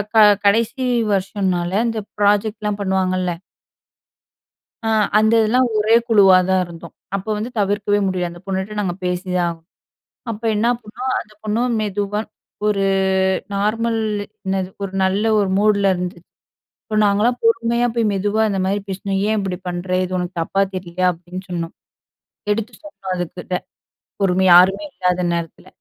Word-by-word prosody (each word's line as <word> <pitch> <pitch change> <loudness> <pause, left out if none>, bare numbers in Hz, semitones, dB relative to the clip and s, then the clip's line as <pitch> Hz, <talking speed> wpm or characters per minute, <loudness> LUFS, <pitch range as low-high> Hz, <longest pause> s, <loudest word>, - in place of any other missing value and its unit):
க - - +5 0.3
கடைசி 230 +5 +2 0.3
வருஷம்ன்னால 190 -2 -1 0.2
அந்த 225 -2 -1 0.2
ப்ராஜெக்ட்லாம் 210 0 +1
பண்ணுவாங்கல்ல 185 -2 0 1.5
அ - - -2 0.3
அந்த 220 +1 +3
இதெல்லாம் 245 +4 +3
ஒரே 215 +2 +4
குழுவா 195 -4 +6
தான் 190 0 +3
இருந்தோம். 170 -1 -11 0.2
அப்ப, 195 +2 -5
வந்து 215 +3 -3
தவிர்க்கவே 205 0 +1
முடில 180 -2 -1
அந்த 170 0 -11
பொண்ணுட்ட 195 +2 -3
நாங்க 180 -4 -2
பேசிதான் 180 0 -1
ஆகணும். 165 -1 -9 0.6
அப்ப 220 0 -6
என்ன 215 +3 +1 0.2
பண்ணோம், 250 +5 -4
அந்த 215 - -12
பொண்ணு 215 +2 0 0.2
மெதுவா 205 0 -2 0.5
ஒரு 200 -2 +1 0.7
நார்மல் 225 +3 0 0.4
என்னது 190 -1 -1
ஒரு 195 -1 -4
நல்ல 195 +3 +1 0.2
ஒரு 200 - +1
மூடுல 200 -1 +3
இருந்துச் 175 -1 -5 0.6
இப்ப 215 - -5
நாங்கலாம் 210 +4 +2
பொறுமையா 230 +1 +2
போய் 230 -1 +2
மெதுவா 205 +2 0
இந்த 195 -2 -1
மாரி 195 +2 0
பேசினோம். 195 0 -2
"ஏன் 220 0 +1
இப்படி 190 -2 -3
பண்ணுற? 175 +1 -4
இது 185 0 -3
உனக்கு 180 0 -3
தப்பா 195 +4 0
தெரியலையா?" 185 0 -2
அப்படின்னு 180 +2 -8
சொன்னோம். 170 -1 -4 0.8
எடுத்து 220 +3 -1
சொன்னோம் 300 -11 -9
அதுக்கிட்ட 180 +1 -4 0.6
பொறுமையா 190 -1 +3
யாருமே 190 +3 +6
இல்லாத 180 0 0
நேரத்தில. 170 -1 -5
195 Hz, 140 wpm, -20 LUFS, 180-215 Hz, 1.5 s, குழுவா